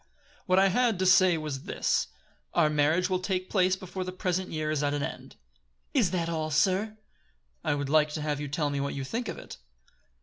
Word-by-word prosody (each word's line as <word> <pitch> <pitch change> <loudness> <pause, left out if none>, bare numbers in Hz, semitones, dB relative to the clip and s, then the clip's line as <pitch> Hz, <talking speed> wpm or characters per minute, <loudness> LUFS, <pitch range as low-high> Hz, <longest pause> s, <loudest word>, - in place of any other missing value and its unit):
What 185 0 +3
I 195 0 +5
had 235 +1 +2
to 185 - 0
say 185 -2 +5
was 150 -4 -5
this: - - 0 0.5
Our 155 -3 +4
marriage 155 +5 +2
will 185 -1 0
take 185 0 -3
place 185 -2 +3
before 185 0 -6
the 185 - -5
present 185 0 -2
year 155 -1 -2
is 155 -2 0
at 145 0 0
an 145 - -2
end." - - -7 0.6
"Is 180 - +3
that 170 -2 -1
all, 160 -2 -2
sir?" 190 +7 +1 0.7
"I - - +1
would 145 -1 -3
like 150 +1 +3
to 155 - -3
have 150 -1 -2
you 145 - -3
tell 145 +1 -1
me 140 - -2
what 140 0 -2
you 135 - -3
think 225 - -3
of - - -5
it?" - - -10
170 Hz, 215 wpm, -28 LUFS, 150-185 Hz, 0.7 s, I